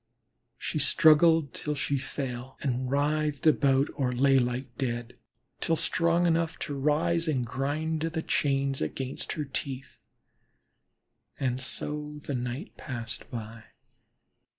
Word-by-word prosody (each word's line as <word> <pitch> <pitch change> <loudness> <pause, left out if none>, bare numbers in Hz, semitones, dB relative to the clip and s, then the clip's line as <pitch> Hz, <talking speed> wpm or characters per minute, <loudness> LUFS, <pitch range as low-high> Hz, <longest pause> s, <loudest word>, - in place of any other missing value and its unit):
She - - -2
struggled 155 0 +5
till 150 0 -2
she 140 0 0
fell, 130 -1 -5
and 130 -2 -1
writhed 150 +1 0
about 140 -2 +4
or 130 -3 0
lay 135 +2 +4
like 125 0 -2
dead, 120 -2 -3 0.4
till 165 - +2
strong 170 +2 +2
enough 165 -1 +1
to 145 - -3
rise 160 +4 +1
and 130 -6 +1
grind 150 +6 -2
the 160 0 -2
chains 135 -1 +1
again 135 -1 -2
with - - -4
her 150 -2 -3
teeth. 135 -1 -4 1.4
And 130 -1 0
so 150 +3 -4
the 145 - -5
night 125 - -4
passed 120 -4 -6
by. 115 -1 -7
140 Hz, 130 wpm, -28 LUFS, 130-155 Hz, 1.4 s, struggled